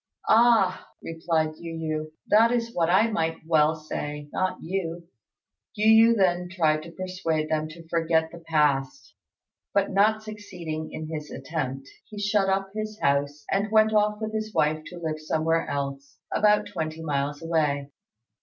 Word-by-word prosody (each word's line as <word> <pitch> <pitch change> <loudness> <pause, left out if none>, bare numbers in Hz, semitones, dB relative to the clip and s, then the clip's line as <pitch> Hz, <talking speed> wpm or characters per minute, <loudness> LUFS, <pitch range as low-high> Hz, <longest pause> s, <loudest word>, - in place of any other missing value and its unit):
"Ah," 220 -5 +4 0.2
replied 160 -1 -1
Yu 165 -1 -7
yü, 155 -1 -3 0.2
"that 225 +3 +5
is 235 -1 -1
what 170 -1 +1
I 215 +6 +4
might 165 -5 -1
well 160 -1 +3
say; 150 -1 -6
not 185 0 -1
you." 170 -1 -4 0.7
Yu 220 +2 +6
yü - - -3
then 180 -2 +2
tried 160 -4 +1
to 170 - -10
persuade 170 -3 -2
them 155 0 0
to 165 +1 -12
forget 160 -1 +1
the 170 - -10
past; 150 -5 0 0.6
but, 200 -1 +2
not 215 +3 +3
succeeding 180 -7 -6
in 155 - -6
his 155 -1 -6
attempt, 135 -2 -4 0.2
he 210 - -11
shut 205 -1 +1
up 195 0 0
his 215 0 -5
house, 140 +1 0
and 200 +2 +1
went 220 0 +4
off 210 0 +2
with 220 0 -4
his 215 0 -3
wife 155 +1 +2
to 180 - -9
live 160 -2 -3
somewhere 160 +1 0
else, 140 0 -4 0.2
about 210 0 +3
twenty 160 -4 -5
miles 145 0 -2
away. 150 -4 0
165 Hz, 160 wpm, -26 LUFS, 155-205 Hz, 0.7 s, Yu